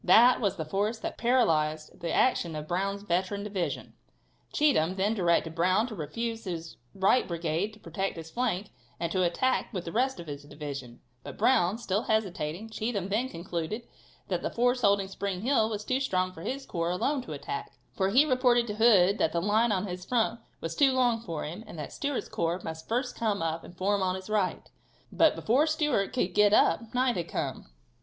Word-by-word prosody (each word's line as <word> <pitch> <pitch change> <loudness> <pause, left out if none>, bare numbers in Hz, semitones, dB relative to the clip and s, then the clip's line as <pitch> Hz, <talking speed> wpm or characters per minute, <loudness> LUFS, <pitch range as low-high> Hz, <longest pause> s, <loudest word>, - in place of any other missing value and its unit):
That 245 +3 +6
was 200 -3 +1
the 160 - -4
force 205 +8 -1
that - - -6
paralyzed 155 -11 +1
the 170 -1 -3
action 170 -10 +2
of 150 0 -5
Brown's 195 +3 -1
veteran 190 +2 -1
division. 200 -4 -3 0.6
Cheatham 220 - +2
then 200 +3 +1
directed 170 -5 +1
Brown 185 +6 +2
to 250 - -7
refuse 225 +8 -4
his 165 -3 -5 0.2
right 195 +6 +3
brigade 170 +3 -1
to 215 - -16
protect 190 +1 -3
his 165 0 -8
flank, 215 -5 -1 0.3
and 170 -1 -2
to 185 - +1
attack 220 +9 +1
with 185 -6 -4
the 165 - -4
rest 260 +5 0
of 170 - -7
his 145 -2 -6
division, 145 -4 -8 0.2
but - - -8
Brown, 220 -6 +3
still 205 -3 -1
hesitating, 200 -2 -2
Cheatham 215 -4 -2
then 230 +6 0
concluded 170 +5 -4 0.4
that - - -1
the - - -2
force 245 +1 +1
holding 200 -3 +3
Spring 195 -1 -4
Hill 225 -2 +2
was 210 -1 -4
too 255 +1 +1
strong 185 -8 0
for 165 - -10
his 265 +8 -4
corps 170 0 -2
alone 265 +11 0
to - - -7
attack, - - -5 0.2
for 190 -1 +1
he 260 +9 +5
reported 250 -3 +3
to 210 -3 -4
Hood 205 -4 +5
that 160 - +2
the 170 - +1
line 215 +5 +2
in 190 -1 0
his 180 -1 -5
front 230 +1 0 0.2
was 165 0 -4
too 270 -2 +4
long 245 -3 +2
for 165 -8 -4
him, 170 +8 -6
and 170 - -10
that 150 - -6
Stewart's 285 -1 -2
corps 170 +2 -1
must 160 0 -7
first 250 +2 -1
come 210 -6 0
up 165 0 -2
and 175 - -13
form 200 +2 +1
on 185 -1 +1
his 190 +2 -8
right. 205 -4 0 0.4
But 320 - +4
before 265 +8 +2
Stewart 300 -10 +1
could 220 -8 -1
get 210 0 +5
up, 225 +1 +3
night 250 -2 +2
had 170 -1 -2
come. - - -3
200 Hz, 200 wpm, -29 LUFS, 170-235 Hz, 0.6 s, That